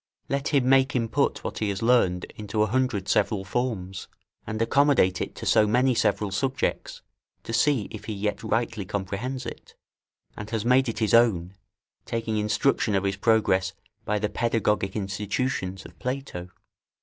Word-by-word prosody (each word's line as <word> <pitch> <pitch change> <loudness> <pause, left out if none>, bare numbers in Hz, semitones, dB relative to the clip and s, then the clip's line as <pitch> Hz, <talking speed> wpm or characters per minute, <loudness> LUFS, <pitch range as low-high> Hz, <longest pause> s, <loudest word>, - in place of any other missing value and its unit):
Let 140 +1 -1
him 140 -4 +2
make 135 0 +4
him 115 -2 +1
put - - 0
what - - -4
he 105 - 0
has 100 +2 -3
learned 105 -7 +3
into 105 0 -1
a - - +3
hundred 110 -4 0
several 100 -1 +1
forms, 95 -4 -3 0.4
and 110 - -3
accommodate 115 -6 +3
it - - -4
to - - -7
so 105 - +4
many 125 +4 +3
several 105 -3 +1
subjects, 130 +7 -2 0.4
to 115 - -6
see 135 -3 +2
if - - -8
he 110 - -4
yet 105 +1 -2
rightly 115 -1 -1
comprehends 105 +7 -4
it, - - -9 0.6
and 105 0 -7
has 110 -1 -2
made 125 +1 +4
it 115 - -4
his 110 -2 0
own, 100 -7 +4 0.5
taking 115 -1 -2
instruction 105 +1 +1
of 95 - +1
his 100 0 -1
progress 95 -4 +2 0.3
by 105 - 0
the 105 +1 0
pedagogic 105 -4 0
institutions 100 -1 -2
of - - -14
Plato. 125 -9 -4
110 Hz, 165 wpm, -26 LUFS, 100-125 Hz, 0.6 s, make